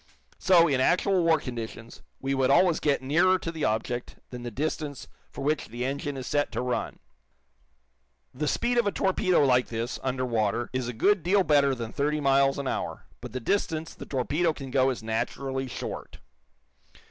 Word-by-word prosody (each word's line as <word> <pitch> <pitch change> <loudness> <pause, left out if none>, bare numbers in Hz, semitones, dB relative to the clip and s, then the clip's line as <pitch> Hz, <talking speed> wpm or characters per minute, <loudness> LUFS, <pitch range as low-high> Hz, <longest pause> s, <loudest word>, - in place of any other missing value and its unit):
So, 170 -2 +5
in 135 -4 +1
actual 180 +4 +3
war 165 -1 +4
conditions, 115 -3 -7 0.2
we 135 +1 -2
would 135 -1 +2
always 170 +4 +4
get 140 -3 +1
nearer 175 +7 +3
to 165 - -5
the 160 -2 -2
object 110 +3 -2 0.2
than 125 -1 -7
the 120 - -5
distance 145 +3 -4 0.2
for 140 - -7
which 150 +1 0
the 120 +2 -4
engine 140 +1 -3
is 130 - -5
set 145 +1 0
to - - -1
run. 125 -1 -2 1.4
The 150 +3 -2
speed 240 +9 +1
of 235 - +2
a - - +2
torpedo 185 -5 +2
like 125 -2 +3
this, 115 +2 -4
under 130 -1 -1
water, 115 0 -1
is 130 -2 -2
a 125 - -4
good 200 - +3
deal 190 +4 +3
better 140 -4 +3
than 115 -2 -6
thirty 150 +2 0
miles 135 -1 +3
an 140 -1 -3
hour, - - -3 0.2
but 125 -1 -8
the 130 - -4
distance 160 - -1
the - - -10
torpedo 150 +6 0
can 135 -3 -8
go 130 0 +3
is 125 -4 -4
naturally 130 +4 -2
short. 125 - -6
135 Hz, 185 wpm, -27 LUFS, 125-160 Hz, 1.4 s, So